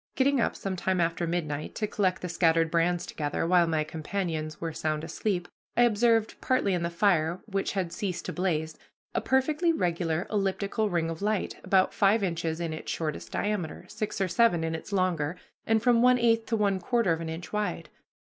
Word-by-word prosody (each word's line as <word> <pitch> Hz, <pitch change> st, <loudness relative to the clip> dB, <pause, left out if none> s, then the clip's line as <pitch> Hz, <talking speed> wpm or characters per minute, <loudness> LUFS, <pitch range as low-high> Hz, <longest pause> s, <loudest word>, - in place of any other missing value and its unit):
Getting 270 Hz, -1 st, +3 dB
up -, -, 0 dB
some 195 Hz, -1 st, -3 dB
time 185 Hz, 0 st, 0 dB
after 170 Hz, 0 st, 0 dB
midnight 155 Hz, -4 st, -3 dB
to 215 Hz, -, -1 dB
collect 190 Hz, -3 st, 0 dB
the -, -, -1 dB
scattered 165 Hz, -1 st, +2 dB
brands 175 Hz, +1 st, +1 dB
together, 145 Hz, +1 st, -2 dB
while 175 Hz, 0 st, +4 dB
my 160 Hz, -2 st, +1 dB
companions 155 Hz, 0 st, -4 dB
were 165 Hz, -1 st, -3 dB
sound 155 Hz, 0 st, -2 dB
asleep, 175 Hz, +2 st, -2 dB, 0.3 s
I 240 Hz, -, +6 dB
observed, 225 Hz, -1 st, +2 dB
partly 255 Hz, -7 st, +1 dB
in 175 Hz, -, 0 dB
the 170 Hz, -, -1 dB
fire, 170 Hz, -2 st, +2 dB
which 195 Hz, -2 st, -2 dB
had 185 Hz, -4 st, -2 dB
ceased 190 Hz, -4 st, -3 dB
to -, -, -4 dB
blaze, 160 Hz, -4 st, -1 dB, 0.3 s
a -, -, 0 dB
perfectly 300 Hz, +6 st, +2 dB
regular 170 Hz, -, 0 dB
elliptical 200 Hz, +1 st, 0 dB
ring 165 Hz, -3 st, 0 dB
of 165 Hz, -, -7 dB
light, 210 Hz, -1 st, -1 dB
about 190 Hz, -1 st, +3 dB
five 205 Hz, +1 st, +3 dB
inches 165 Hz, -3 st, -1 dB
in 165 Hz, -2 st, -2 dB
its 155 Hz, -, -5 dB
shortest 155 Hz, -2 st, -4 dB
diameter, 200 Hz, -6 st, -2 dB
six 215 Hz, 0 st, -4 dB
or 195 Hz, -, +1 dB
seven 175 Hz, -2 st, +3 dB
in 160 Hz, 0 st, -1 dB
its 160 Hz, +5 st, -6 dB
longer, 180 Hz, -5 st, 0 dB, 0.3 s
and 225 Hz, 0 st, +2 dB
from 240 Hz, -1 st, +4 dB
one 250 Hz, 0 st, +6 dB
eighth 230 Hz, -2 st, +2 dB
to 230 Hz, -, 0 dB
one 200 Hz, -2 st, +1 dB
quarter 220 Hz, -2 st, +1 dB
of 165 Hz, -, -3 dB
an 165 Hz, -, -4 dB
inch 165 Hz, +4 st, -7 dB
wide. 210 Hz, 0 st, -2 dB
180 Hz, 195 wpm, -28 LUFS, 165-210 Hz, 0.3 s, I